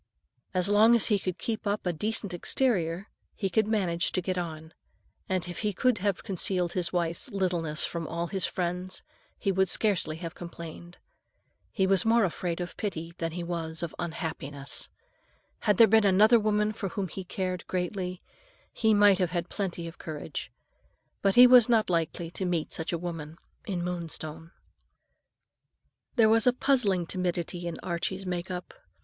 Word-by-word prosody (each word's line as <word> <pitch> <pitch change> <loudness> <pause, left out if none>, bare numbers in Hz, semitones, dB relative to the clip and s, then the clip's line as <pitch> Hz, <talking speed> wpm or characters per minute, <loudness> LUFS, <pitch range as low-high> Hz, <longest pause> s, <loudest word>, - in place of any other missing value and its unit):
As 180 0 +2
long 215 +3 +6
as 230 - +4
he 200 - +3
could 185 -2 -3
keep 220 -2 -3
up 205 0 -1
a 180 - +1
decent 210 +2 -2
exterior, 180 -2 0 0.3
he 195 -3 -2
could 215 +3 +2
manage 185 -5 +1
to - - +1
get 185 +1 -1
on; 160 -2 -5 0.6
and 185 -2 -1
if 175 - -6
he 210 -2 -1
could 250 +3 +2
have 200 -1 -1
concealed 180 -2 -1
his 180 -2 -1
wife's 170 -2 -1
littleness 175 -5 0
from 165 -2 -4
all 170 +1 -2
his 190 +1 -2
friends, 180 +1 -2 0.3
he 195 - 0
would 190 0 +2
scarcely 195 -7 +2
have 165 0 -6
complained. 170 0 -9 0.7
He 190 - +1
was 190 -1 +3
more 230 +1 +4
afraid 175 -1 -2
of 175 0 -5
pity 170 -5 -4
than 165 -1 -2
he 175 0 -4
was 165 -1 -4
of 170 - -4
any - - 0
unhappiness. 145 -4 -4 0.7
Had 210 -3 +2
there 230 - +9
been 220 0 +4
another 210 +4 +6
woman 210 0 +1
for 200 -2 -4
whom 195 +2 -3
he 190 +3 -7
cared 185 0 -4
greatly, 180 0 -3 0.5
he 220 -1 +3
might 205 -2 +6
have 180 -2 +1
had 175 0 -3
plenty 180 -4 -3
of 165 - -10
courage; 155 -2 -6 0.7
but 195 -1 +2
he 250 - +10
was 250 -2 +7
not 220 -5 +3
likely 165 0 -1
to 190 - -4
meet 175 -3 -1
such 160 - -3
a 170 - 0
woman 165 -2 -6 0.3
in 180 -4 -2
Moonstone. 165 -2 -4 1.7
There 225 -3 +6
was 225 +1 +4
a 250 - +6
puzzling 220 -10 +2
timidity 175 -1 -2
in 170 - -5
Archie's 185 +2 -3
make 180 0 -3
up. 180 -1 -6
180 Hz, 175 wpm, -28 LUFS, 170-205 Hz, 1.7 s, he